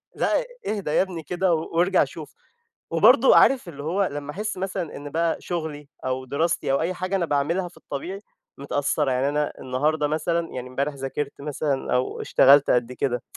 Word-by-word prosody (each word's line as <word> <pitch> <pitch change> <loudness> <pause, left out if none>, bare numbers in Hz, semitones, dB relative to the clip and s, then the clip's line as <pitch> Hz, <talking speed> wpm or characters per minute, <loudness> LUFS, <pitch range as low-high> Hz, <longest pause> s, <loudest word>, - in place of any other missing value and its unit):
لأ، - - +1 0.2
اهدى 200 -8 -2
يابني 175 -1 0
كده، 180 +3 0
وارجع 170 +3 +2
شوف. - - -9 0.6
وبرضه، - - +6
عارف، 260 -9 +5
اللي 145 -3 -8
هو، 185 +6 0
لمَّا 145 0 -5
أحس 210 +4 -4
مثلًا 185 -3 -4
إن 145 0 -8
بقى 165 +1 0
شغلي، 155 -4 -5 0.2
أو 130 0 -2
دراستي، 145 +2 0
أو 135 - +2
أي 175 +3 -1
حاجة 185 +2 -2
أنا 175 -3 0
باعملها 165 +5 0
في - - -22
الطبيعي، 180 +8 -6 0.4
متأثّرة. 140 0 0
يعني، 130 +2 +1
أنا 150 +1 -1
النهارده 150 +4 0
مثلًا 165 +2 -1
يعني 125 0 -6
امبارح 140 +3 -2
ذاكرت 140 +1 -5
مثلًا، 145 -1 -2
أو 125 +1 -1
اشتغلت 140 +1 +5
قد 125 0 +2
كده، 125 -1 -1
150 Hz, 170 wpm, -24 LUFS, 140-175 Hz, 0.6 s, وبرضه